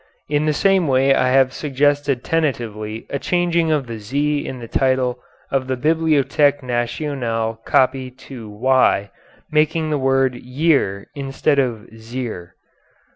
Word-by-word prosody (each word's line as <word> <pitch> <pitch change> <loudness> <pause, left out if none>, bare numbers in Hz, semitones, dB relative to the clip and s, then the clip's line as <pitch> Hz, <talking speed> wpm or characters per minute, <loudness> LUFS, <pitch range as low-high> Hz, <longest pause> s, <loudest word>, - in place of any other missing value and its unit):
In 150 +1 0
the - - +3
same 190 +1 +2
way 135 0 +4
I 130 - +2
have 130 0 +3
suggested 145 -2 0
tentatively 115 -9 -2
a 140 - -2
changing 170 -1 +1
of 150 -3 +1
the 115 -2 -7
z 145 +7 -1
in 130 - -6
the 120 -2 -8
title 130 -1 +1 0.3
of 135 -1 0
the 130 -1 -1
Bibliothèque 150 -1 +2
Nationale 120 -2 -2
copy 130 0 +2
to 125 -3 -11
y, 105 -2 +2 0.4
making 155 +1 +1
the 150 - 0
word 135 -1 +2
yere 125 -5 0
instead 140 +1 0
of 120 -5 -1
zere. 110 -6 -7
135 Hz, 135 wpm, -20 LUFS, 120-145 Hz, 0.4 s, way